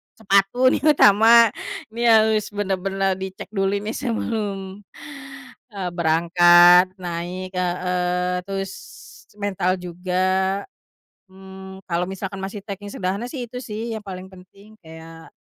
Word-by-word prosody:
sepatu 220 +5 +2
nih - - 0 0.2
utama, 225 +2 +6 0.4
ini 235 +1 -1
harus 220 -1 +4
benar-benar 195 -1 -2
dicek 190 +1 -8
dulu 195 0 0
nih 210 +2 -4
sebelum, 205 -5 -4 0.9
eee, 195 -3 -4
berangkat 175 +2 +5
naik, 180 +2 -6
heeh, 180 0 -1
terus 195 -1 -4 0.7
mental 190 -3 -1
juga, 185 +2 -1 0.7
mmm, 190 0 -12
kalo 175 +1 -2
misalkan 195 0 -6
masih 195 +1 -6
treking 205 0 -7
sederhana 195 +4 -3
sih 250 -3 -5
itu 250 +2 -8
sih 225 0 -6
yang 220 - -5
paling 190 -2 -8
penting 195 +3 -17
kayak, 160 0 -13
190 Hz, 115 wpm, -22 LUFS, 180-205 Hz, 0.9 s, utama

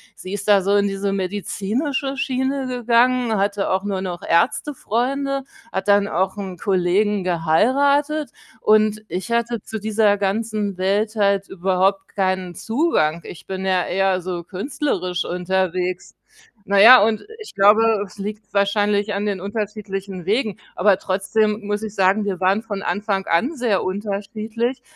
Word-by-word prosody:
Sie 185 - -9
ist 205 0 -5
da 205 -2 +5
so 200 +2 +1
in 200 0 +2
diese 195 0 -2
medizinische 210 - -2
Schiene 265 +1 -1
gegangen, 245 -1 +2
hatte 200 0 0
auch 190 +1 0
nur 195 -2 -2
noch 180 -2 -5
Ärztefreunde, 275 - 0 0.3
hat 190 +1 -3
dann 200 0 +4
auch 190 +2 -1
'n 190 -3 -6
Kollegen 195 +2 +1
geheiratet 275 - +2 0.3
und 215 0 +3
ich 190 +5 -5
hatte 235 -1 0
zu 220 - -6
dieser 210 -1 +2
ganzen 205 0 -2
Welt 205 +4 0
halt 200 -2 +1
überhaupt 190 +1 0
keinen 185 -2 -1
Zugang. 220 - 0
Ich 165 - -11
bin 190 0 -4
ja 185 -2 +1
eher 190 0 +1
so 175 -1 -4
künstlerisch 185 - -3
unterwegs. 180 0 -2 0.6
Na 200 - +3
ja 245 +5 +10
und 215 0 0 0.2
ich 435 - -11
glaube, 215 +1 +4
es 190 - -16
liegt 210 +1 -7
wahrscheinlich 205 +1 +1
an 200 +1 -2
den 200 -2 -2
unterschiedlichen 200 -3 -5
Wegen. 215 0 0 0.2
Aber 195 0 +3
trotzdem 210 +3 0
muss 205 +1 -2
ich 215 -1 -6
sagen, 195 +2 +2
wir 195 -3 -2
waren 190 +3 +2
von 205 -3 -5
Anfang 200 -2 -1
an 245 - +1
sehr 235 -7 0
unterschiedlich 215 +5 -3
205 Hz, 150 wpm, -21 LUFS, 190-225 Hz, 0.6 s, ja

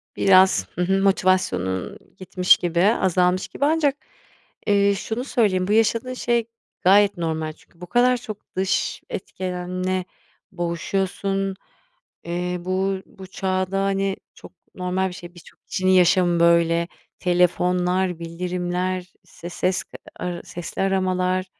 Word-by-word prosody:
Biraz, 185 - +5
hı 180 - -2
hı, 190 +2 +2
motivasyonun 185 - +1 0.2
gitmiş 185 -1 +3
gibi, 175 -1 -1
azalmış 185 -3 +2
gibi 280 - -2
ancak, 300 -2 +2 0.7
eee, 200 -1 +4
şunu 225 +5 -4
söyleyeyim: 205 -9 +1
Bu - - -1
yaşadığın 225 +3 +2
şey 235 -2 0 0.3
gayet 200 +1 +5
normal. 160 -2 -2
Çünkü 170 +2 -26
bu 180 - -7
kadar 245 +3 +3
çok 215 -3 -10
dış 190 +1 -1
etkenle 185 0 -3 0.5
boğuşuyorsun. 195 +2 -2 0.7
Eee, 180 +1 -2
bu 190 +2 -1
bu 190 - -12
çağda, 185 0 -1
hani, 195 0 0 0.2
çok - - -14 0.2
normal 185 +1 -1
bir - - -8
şey. 175 0 -11
Birçok 175 -3 -16
kişinin 185 0 0
yaşamı 180 -1 +4
böyle. 170 0 +3 0.3
Telefonlar, 180 0 +1
bildirimler, 180 +2 -3
işte, 170 0 -10
ses 180 +1 -1 0.3
ara 175 -1 -4
sesli 175 +1 -5
aramalar. 185 -1 0
185 Hz, 120 wpm, -23 LUFS, 180-195 Hz, 0.7 s, Biraz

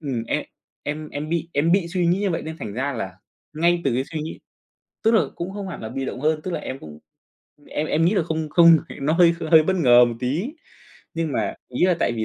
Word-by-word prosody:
ừm, 135 -7 -3
em - - -1 0.4
em 150 +1 -4
em 150 +2 -5
bị 170 0 -2
em 160 +4 +2
bị 185 -2 +2
suy 175 -1 0
nghĩ 175 +3 +2
như 200 -2 0
vậy 165 - -2
nên 160 0 -6
thành 105 - -6
ra 135 +6 -2
là 95 -6 -4 0.4
ngay 170 +2 +3
từ 135 - +1
cái 130 +2 0
suy 155 +2 -5
nghĩ 160 - -6 0.7
tức 225 - +4
là 220 - +5
cũng 180 +3 -5
không 200 -2 -5
hẳn 180 - -7
là 110 - -5
bị 135 +2 -4
động 125 - -5
hơn, 155 0 +1
tức 185 - -5
là - - -2
em 130 - -6
cũng 75 -1 -11 0.7
em 155 +1 -3
em 160 +1 +1
nghĩ 180 +6 +3
là 185 - +2
không 160 -1 -3
không 165 +1 +7 0.2
nó 145 +3 +1
hơi 170 0 +5 0.2
hơi 160 -1 +8
bất 190 +4 0
ngờ 125 -7 +6
một 120 -1 -2
tí. 160 - -2 0.6
Nhưng 165 -3 -2
mà - - -1
ý 125 +7 0
là 180 -2 +2
tại 120 - +2
vì 110 -1 -2
155 Hz, 255 wpm, -23 LUFS, 135-170 Hz, 0.7 s, hơi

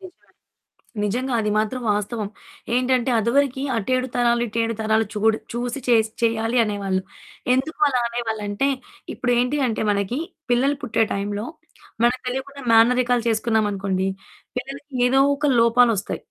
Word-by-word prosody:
నిజమే. 370 -2 -15 0.7
నిజంగా 250 +5 -1
అది 210 - -1
మాత్రం 220 +4 -1
వాస్తవం. 210 +1 -2 0.5
ఏంటంటే 255 0 +2
అదవరకి 265 +4 +1
అటు 225 +2 -2
7 255 0 -1
తరాలు, 240 -1 +2
ఇటు 230 +1 -3
7 230 0 -1
తరాలు 220 0 +2
చూడు 220 +1 +2 0.2
చూసి 245 +2 -3
చేసి 220 -2 +3
చెయ్యాలి 225 +1 +1
అనేవాళ్ళు. 200 -3 -1 0.5
ఎందుకు 270 +5 -1
అలా 250 -3 +1
అనేవాళ్ళంటే 225 +1 -2 0.5
ఇప్పుడేంటి 250 +3 +1
అంటే 225 - -1
వాళ్ళకి 205 +5 0 0.3
పిల్లలు 270 +4 +2
పుట్టే 225 -2 +1
టైంలో 205 +2 -3 0.6
మనకు 245 +2 +2
తెలియకుండా 270 +2 -4
మేనరికాలు 245 +1 +4
చేసుకున్నామనుకోండి 205 -4 0 0.5
పిల్లలకి 275 +2 -7
ఏదో 270 +2 +4 0.2
ఒక 290 -1 +1
లోపాలొస్తయి. 230 -3 +3
235 Hz, 130 wpm, -22 LUFS, 215-255 Hz, 0.7 s, మేనరికాలు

